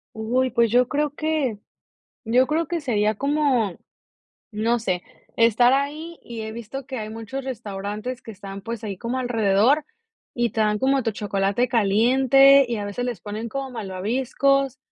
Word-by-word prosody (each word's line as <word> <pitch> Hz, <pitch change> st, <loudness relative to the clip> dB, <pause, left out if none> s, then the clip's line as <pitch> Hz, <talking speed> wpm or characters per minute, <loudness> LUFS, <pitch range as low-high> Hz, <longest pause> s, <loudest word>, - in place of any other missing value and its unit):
Uy, 250 Hz, +4 st, 0 dB
pues 235 Hz, -2 st, +2 dB
yo 250 Hz, +1 st, +3 dB
creo 295 Hz, 0 st, 0 dB
que, 300 Hz, -9 st, -1 dB, 0.7 s
yo 250 Hz, +3 st, +3 dB
creo 320 Hz, +1 st, 0 dB
que 340 Hz, -2 st, -2 dB
sería 215 Hz, -5 st, +1 dB
como, 275 Hz, -, +1 dB, 0.7 s
no 230 Hz, +3 st, 0 dB
sé, 180 Hz, -5 st, -2 dB, 0.3 s
estar 235 Hz, +2 st, +5 dB
ahí 305 Hz, +5 st, -2 dB
y 235 Hz, -2 st, -7 dB
he 220 Hz, 0 st, -5 dB
visto 235 Hz, +4 st, -7 dB
que 260 Hz, -, -5 dB
hay 215 Hz, -1 st, -5 dB
muchos 225 Hz, +5 st, -6 dB
restaurantes 215 Hz, +1 st, -5 dB
que 225 Hz, -, -9 dB
están, 195 Hz, 0 st, -9 dB
pues, 230 Hz, +1 st, -6 dB
ahí 200 Hz, -3 st, -4 dB
como 240 Hz, +6 st, -3 dB
alrededor 245 Hz, +4 st, +2 dB, 0.5 s
y 240 Hz, -1 st, 0 dB
te 220 Hz, -, 0 dB
dan 210 Hz, -1 st, +1 dB
como 270 Hz, -1 st, +2 dB
tu 225 Hz, -, 0 dB
chocolate 205 Hz, +3 st, 0 dB
caliente 260 Hz, +6 st, +5 dB
y 235 Hz, -2 st, -2 dB
a 205 Hz, -, -4 dB
veces 225 Hz, +5 st, -4 dB
les 235 Hz, -8 st, -4 dB
ponen 215 Hz, +2 st, -5 dB
como 270 Hz, +3 st, -4 dB
malvaviscos, 255 Hz, +6 st, 0 dB
235 Hz, 165 wpm, -23 LUFS, 215-270 Hz, 0.7 s, estar